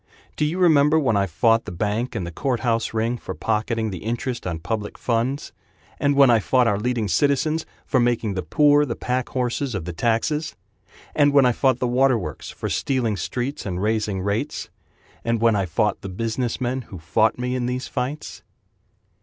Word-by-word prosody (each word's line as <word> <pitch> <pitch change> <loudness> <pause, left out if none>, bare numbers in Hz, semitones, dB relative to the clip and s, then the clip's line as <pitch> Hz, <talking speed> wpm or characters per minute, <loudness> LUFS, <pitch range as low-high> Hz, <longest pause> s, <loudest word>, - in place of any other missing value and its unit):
Do 150 - +1
you 160 +4 -1
remember 155 -4 +5
when 130 -8 +2
I 100 -1 +2
fought 115 +7 +2
The 105 - -6
bank 105 +7 -2
and 90 - -2
the 85 - -6
courthouse 120 +2 -1
ring, 115 +2 -1
For - - -6
pocketing 110 0 -1
the 90 - -5
interest 120 - -3
on 85 -2 -2
public 105 +5 -4
funds? 125 +4 -1 0.5
And 145 0 +2
when 140 -3 +6
I 115 - +5
fought 125 +4 +2
our 100 -3 +1
leading 120 -1 -1
citizens 145 +6 +1 0.2
For 130 - +2
making 120 -3 +1
the 95 - -2
poor 145 - +4
the 120 -5 -3
pack 125 0 -2
horses 125 0 -2
of 90 -4 -4
the 90 - -5
taxes? 120 - 0 0.6
And 145 -1 +3
when 140 -2 +6
I 125 - +5
fought 130 +1 +2
the 125 - -1
water 130 +1 +3
works 75 -9 -6
For - - -5
stealing 125 -6 0
streets 125 - -3
and 90 -3 -3
raising 105 -2 0
rates? 105 +9 -2 0.5
And 115 -1 0
when 115 -1 +4
I 100 -2 0
fought 90 +5 0
the 100 - -6
business 115 +5 -2
men 130 +1 -1
Who 95 - -8
fought 110 +7 +1
me 125 0 -2
in 125 -1 -1
these 125 +1 -3
fights? 145 +4 -4
120 Hz, 195 wpm, -23 LUFS, 105-130 Hz, 0.6 s, when